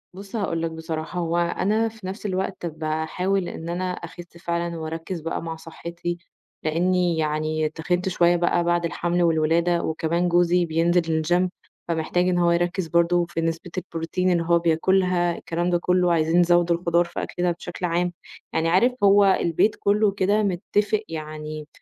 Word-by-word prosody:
بُصّ، 195 Hz, +2 st, -9 dB
هاقول 180 Hz, -6 st, -1 dB
لك، 165 Hz, -1 st, -2 dB
بصراحة 160 Hz, +1 st, -5 dB
هو 170 Hz, 0 st, -1 dB
أنا 200 Hz, +6 st, +1 dB
في 215 Hz, -4 st, -10 dB
نفس 195 Hz, +3 st, -7 dB
الوقت 190 Hz, -2 st, -2 dB
باحاول 160 Hz, +4 st, -1 dB
إن 165 Hz, +1 st, -6 dB
أنا 180 Hz, +1 st, -2 dB
أخِسّ 175 Hz, -1 st, -9 dB
فعلًا، 170 Hz, 0 st, -3 dB
وأركِّز 165 Hz, +2 st, -5 dB
بقى 165 Hz, -, -3 dB
مع 165 Hz, -1 st, -5 dB
صحّتي، 170 Hz, +1 st, -6 dB, 0.5 s
لإنّي 175 Hz, +1 st, +1 dB
يعني 155 Hz, 0 st, 0 dB
تخِنِت 180 Hz, +4 st, -1 dB
شوية 175 Hz, -1 st, +3 dB
بقى 175 Hz, 0 st, +1 dB
بعد 175 Hz, 0 st, +1 dB
الحمل 175 Hz, +2 st, 0 dB
والولادة، 165 Hz, +1 st, +2 dB
وكمان 165 Hz, +2 st, 0 dB
جوزي 175 Hz, 0 st, +3 dB
بينزل 165 Hz, 0 st, +1 dB
الgym 175 Hz, +3 st, +2 dB, 0.4 s
فمحتاج 170 Hz, +2 st, 0 dB
إن 180 Hz, -, +1 dB
هو 175 Hz, -1 st, +3 dB
يركِّز 175 Hz, +1 st, 0 dB
برضه 170 Hz, +1 st, +2 dB
في 165 Hz, -, -2 dB
نسبة 165 Hz, +2 st, -3 dB
البروتين 180 Hz, +1 st, -1 dB
اللي 170 Hz, -1 st, +2 dB
هو 170 Hz, 0 st, +4 dB
بياكلها، 175 Hz, +1 st, +2 dB
الكلام 175 Hz, +1 st, -2 dB
ده 175 Hz, -, +3 dB
كُلّه، 180 Hz, 0 st, +2 dB
عايزين 165 Hz, +1 st, +2 dB
نزوِّد 175 Hz, 0 st, +3 dB
الخضار 170 Hz, 0 st, +2 dB
في 170 Hz, -, -5 dB
أكلنا 175 Hz, 0 st, -1 dB
بشكل 175 Hz, +1 st, -5 dB
عام، 175 Hz, +1 st, 0 dB, 0.4 s
يعني 165 Hz, 0 st, +1 dB
عارف، 190 Hz, +9 st, +4 dB
هو 200 Hz, 0 st, +6 dB
البيت 190 Hz, +1 st, +2 dB
كُلّه 205 Hz, 0 st, +3 dB
كده 205 Hz, +2 st, +1 dB
متفق 205 Hz, +3 st, 0 dB
يعني 155 Hz, -1 st, -6 dB
175 Hz, 160 wpm, -24 LUFS, 165-180 Hz, 0.5 s, هو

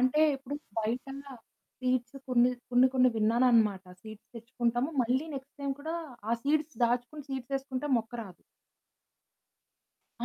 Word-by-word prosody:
అంటే 255 Hz, +4 st, +3 dB, 0.2 s
ఇప్పుడు 270 Hz, +1 st, -6 dB, 0.2 s
బయట 230 Hz, +5 st, -1 dB, 0.8 s
సీడ్స్ 255 Hz, 0 st, 0 dB
కొన్ని, 245 Hz, 0 st, +5 dB, 0.2 s
కొన్ని, 250 Hz, +1 st, +6 dB
కొన్ని 255 Hz, 0 st, +6 dB
విన్నానన్నమాట. 220 Hz, -3 st, +3 dB, 0.2 s
సీడ్స్ 215 Hz, 0 st, -12 dB
తెచ్చుకుంటాము, 240 Hz, +3 st, -1 dB
మళ్ళీ 255 Hz, +6 st, +1 dB
నెక్స్ట్ 270 Hz, +2 st, -8 dB
టైమ్ 280 Hz, -1 st, -1 dB
కూడా 320 Hz, +3 st, -3 dB, 0.4 s
ఆ -, -, +3 dB
సీడ్స్ 300 Hz, -3 st, 0 dB
దాచుకొని 245 Hz, +5 st, -1 dB
సీడ్స్ 265 Hz, 0 st, -4 dB
ఎసుకుంటే 270 Hz, +1 st, -4 dB
మొక్క 225 Hz, 0 st, -3 dB
రాదు. 190 Hz, -5 st, -13 dB, 1.8 s
ఆ! -, -, -1 dB
250 Hz, 130 wpm, -30 LUFS, 230-270 Hz, 1.8 s, కొన్ని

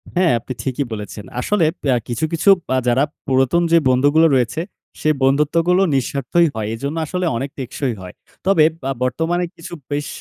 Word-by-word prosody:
হ্যাঁ, 180 Hz, -1 st, +3 dB
আপনি 130 Hz, +3 st, -7 dB
ঠিকই 135 Hz, +1 st, -2 dB
বলেছেন। 105 Hz, -1 st, -7 dB
আসলে 200 Hz, +5 st, +1 dB, 0.2 s
প্যা 135 Hz, -3 st, +2 dB
কিছু 120 Hz, +5 st, -1 dB
কিছু 165 Hz, +5 st, +2 dB, 0.3 s
আ -, -, +2 dB
যারা 125 Hz, +3 st, +3 dB, 0.2 s
পুরাতন 135 Hz, +5 st, +2 dB
যে 170 Hz, -, +6 dB
বন্ধুগুলো 145 Hz, +5 st, +4 dB
রয়েছে, 125 Hz, +5 st, 0 dB, 0.4 s
সে 155 Hz, -, +2 dB
বন্ধুত্বগুলো 155 Hz, +7 st, +2 dB
নিঃস্বার্থই 140 Hz, +5 st, +1 dB
হয়। 110 Hz, -1 st, -3 dB
এজন্য 140 Hz, +7 st, -4 dB
আসলে 180 Hz, +4 st, -2 dB
অনেক 135 Hz, +4 st, -3 dB
টেকসই 130 Hz, 0 st, -3 dB
হয়। 90 Hz, -1 st, -9 dB, 0.3 s
তবে 190 Hz, -5 st, +4 dB, 0.2 s
বা 135 Hz, -, -1 dB
বর্তমানে 165 Hz, +7 st, 0 dB
কিছু 165 Hz, -, -10 dB, 0.2 s
বেশ 145 Hz, 0 st, -2 dB
140 Hz, 165 wpm, -19 LUFS, 125-165 Hz, 0.4 s, যে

